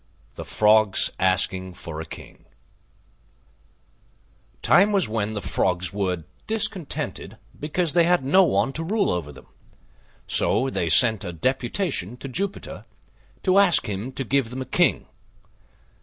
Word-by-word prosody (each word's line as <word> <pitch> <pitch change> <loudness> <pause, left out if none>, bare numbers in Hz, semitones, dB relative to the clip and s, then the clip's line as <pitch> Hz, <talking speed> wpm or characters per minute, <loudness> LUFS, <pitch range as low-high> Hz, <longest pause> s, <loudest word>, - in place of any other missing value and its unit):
THE - - -8
FROGS 105 -2 +3
ASKING 95 0 0
FOR 80 -2 -7
A - - -7
KING - - -12 2.2
Time 200 +4 +5
was 200 -2 +2
when 110 -1 -2
the 105 - -5
Frogs 90 0 -1
were 90 -4 -2 0.2
discontented 215 -7 -4 0.2
because 155 +2 -2
they 170 -1 +4
had 175 -6 +2
no 185 +8 +5
one 135 -4 +1
to 165 - -4
rule 205 +4 0
over 85 -5 -3
them: 65 - -15 0.8
so 135 +1 +2
they 85 - -1
sent 110 +4 +5
a - - -5
deputation 125 - -2
to 135 - -8
Jupiter 195 +9 -5 0.6
to 190 +1 +4
ask 180 -9 +4
him 105 +5 -4
to 135 - -3
give 135 -1 0
them 130 +2 -5
a - - -15
King. - - +1
125 Hz, 140 wpm, -23 LUFS, -, 2.2 s, Time